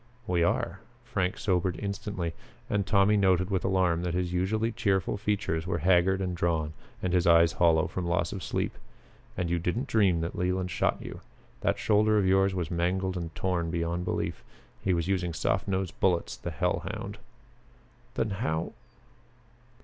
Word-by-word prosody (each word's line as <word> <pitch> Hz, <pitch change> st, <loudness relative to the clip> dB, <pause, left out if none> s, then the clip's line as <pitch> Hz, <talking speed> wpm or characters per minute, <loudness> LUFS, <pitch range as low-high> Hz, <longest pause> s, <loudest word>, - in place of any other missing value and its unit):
"We 90 Hz, -3 st, +1 dB
are." 85 Hz, -, 0 dB, 0.3 s
Frank 90 Hz, 0 st, -1 dB
sobered 95 Hz, -4 st, 0 dB
instantly, 100 Hz, -4 st, -3 dB, 0.3 s
and 100 Hz, -2 st, 0 dB
Tommy 100 Hz, 0 st, +4 dB
noted 95 Hz, -1 st, +3 dB
with 95 Hz, -3 st, 0 dB
alarm 95 Hz, -3 st, +2 dB
that 90 Hz, -1 st, -2 dB
his 90 Hz, -1 st, -1 dB
usually 110 Hz, +6 st, 0 dB
cheerful 100 Hz, -6 st, 0 dB
features 100 Hz, -5 st, -1 dB
were 85 Hz, -, 0 dB
haggard 95 Hz, +3 st, +3 dB
and 90 Hz, -2 st, -2 dB
drawn 80 Hz, -3 st, 0 dB, 0.3 s
and 90 Hz, -1 st, 0 dB
his 90 Hz, -2 st, +3 dB
eyes 85 Hz, -1 st, +6 dB
hollow 80 Hz, -1 st, +3 dB
from 90 Hz, -1 st, -3 dB
loss 85 Hz, 0 st, 0 dB
of 95 Hz, -, -5 dB
sleep. -, -, -2 dB, 0.6 s
"And 90 Hz, -2 st, 0 dB
you 85 Hz, 0 st, 0 dB
didn't 100 Hz, +10 st, -1 dB
dream 95 Hz, -7 st, +3 dB
that 85 Hz, -, -3 dB
Leland 90 Hz, 0 st, -1 dB
shot -, -, +1 dB
you. -, -, -8 dB, 0.4 s
That -, -, +1 dB
shoulder 110 Hz, 0 st, +3 dB
of 100 Hz, -, +3 dB
yours 95 Hz, 0 st, +3 dB
was 90 Hz, -3 st, -2 dB
mangled 90 Hz, +2 st, 0 dB
and 85 Hz, -2 st, -5 dB
torn 90 Hz, -3 st, -1 dB
beyond 85 Hz, +1 st, -1 dB
belief. -, -, -2 dB, 0.4 s
He 95 Hz, -, +2 dB
was 85 Hz, 0 st, -1 dB
using 90 Hz, -3 st, 0 dB
soft 80 Hz, -, 0 dB
nosed 95 Hz, -3 st, -1 dB
bullets, 90 Hz, -3 st, +1 dB
the -, -, -6 dB
hell -, -, 0 dB
hound!" 100 Hz, +2 st, -6 dB, 1.0 s
"Then 110 Hz, -, 0 dB
how 85 Hz, -5 st, -2 dB
90 Hz, 170 wpm, -28 LUFS, 85-95 Hz, 1.0 s, eyes